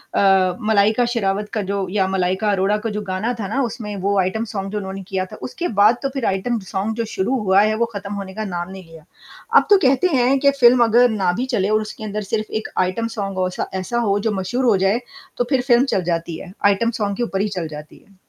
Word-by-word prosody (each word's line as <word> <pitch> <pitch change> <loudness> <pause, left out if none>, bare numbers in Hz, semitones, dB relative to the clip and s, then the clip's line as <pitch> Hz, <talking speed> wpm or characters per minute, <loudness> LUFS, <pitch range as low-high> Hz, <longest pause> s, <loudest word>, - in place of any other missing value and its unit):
अ, 190 -2 +4
मलाइका 215 +2 +3
शेरावत 210 -3 -1
का 215 - 0
जो, 195 -1 -2
या 195 -1 +1
मलाइका 190 +2 0
अरोड़ा 200 +1 +1
का - - +1
जो 210 0 -3
गाना 190 +6 -1
था 200 - -3
ना, 265 +8 -1
उसमें 230 -3 -5
वो 200 0 +2
आइटम 190 +5 0
सॉन्ग 195 -1 -4
जो 210 - -3
उन्होंने 195 -1 -5
किया 190 -1 -2
था, - - -11
उसके 345 +7 -4
बाद 215 +4 +6
तो 275 - 0
फिर 270 -3 -4
आइटम 195 +5 0
सॉन्ग 205 +3 -2
जो 230 0 -2
शुरू 210 +8 0
हुआ 195 -2 +4
है, 215 +1 +2
वो 235 +2 +1
ख़त्म 200 0 -5
होने 195 -2 -6
का 215 +2 -4
नाम 175 -2 -4
नहीं 190 0 -9
लिया। 165 -2 -15 0.5
अब - - +4
तो 410 - +8
कहते 260 +6 +4
हैं 260 +2 +3
कि 280 +1 +4
फ़िल्म 240 -1 +6
अगर 240 +2 +5
ना 195 -5 +1
भी 245 +8 -2
चले, 200 -3 +1
और 215 0 +2
उसके 215 0 -8
अंदर 210 0 -3
सिर्फ़ 215 -1 -2
एक - - -7 0.2
आइटम 205 +5 -2
सॉन्ग 195 -2 -3
हो, 185 0 +1
ऐसा 180 - -4
ऐसा 210 +6 -3
हो, 200 0 +2
जो 220 +2 -1
मशहूर 205 +6 -2
हो 230 -4 +5
जाए, 200 +5 +2 0.4
तो - - +2
फिर 265 -3 +2
फ़िल्म 245 0 +5
चल 185 - +1
जाती 170 -1 -2
है। 185 - -10
आइटम 205 +3 +3
सॉन्ग 200 -1 -1
के 240 - 0
ऊपर 195 -4 -2
ही 210 - +1
चल 170 -3 -2
जाती 150 0 -10
है। 200 - -23
205 Hz, 255 wpm, -20 LUFS, 190-230 Hz, 0.5 s, तो